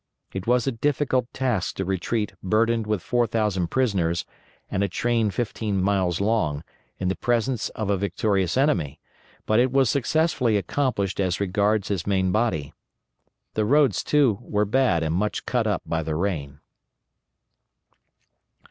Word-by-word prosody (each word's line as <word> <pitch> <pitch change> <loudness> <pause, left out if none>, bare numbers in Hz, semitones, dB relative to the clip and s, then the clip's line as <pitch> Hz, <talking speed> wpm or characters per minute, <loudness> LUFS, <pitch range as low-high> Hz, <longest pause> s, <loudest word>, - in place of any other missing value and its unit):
It 95 +1 -5
was 125 -1 +3
a 135 - +1
difficult 130 0 0
task 115 -10 -1
to 95 - -3
retreat 100 +4 -1
burdened 110 +3 +1
with 105 -4 -1
4,000 110 -6 0
prisoners, 90 -9 0 0.4
and 95 - -1
a - - +2
train 115 +3 0
fifteen 105 -2 -2
miles 95 -3 +1
long, 100 -9 0 0.3
in 95 - -2
the 95 - 0
presence 120 0 0
of 105 -2 -1
a 100 - +2
victorious 100 0 0
enemy, 90 - +1 0.5
but 110 +1 +3
it 125 +1 +3
was 135 -2 +3
successfully 140 -4 +1
accomplished 100 -1 -1
as 95 -3 0
regards 100 +1 +1
his 100 -3 -2
main 95 -2 +1
body. 85 -10 0 0.8
The 110 - 0
roads, 140 -2 +3
too, 135 -9 +3
were 105 -3 0
bad 105 -7 +2
and 80 0 -1
much 105 +5 -1
cut 120 -3 0
up 100 -5 -1
by 80 0 -1
the 80 -1 -3
rain. 75 -6 -3
105 Hz, 150 wpm, -24 LUFS, 95-120 Hz, 0.8 s, was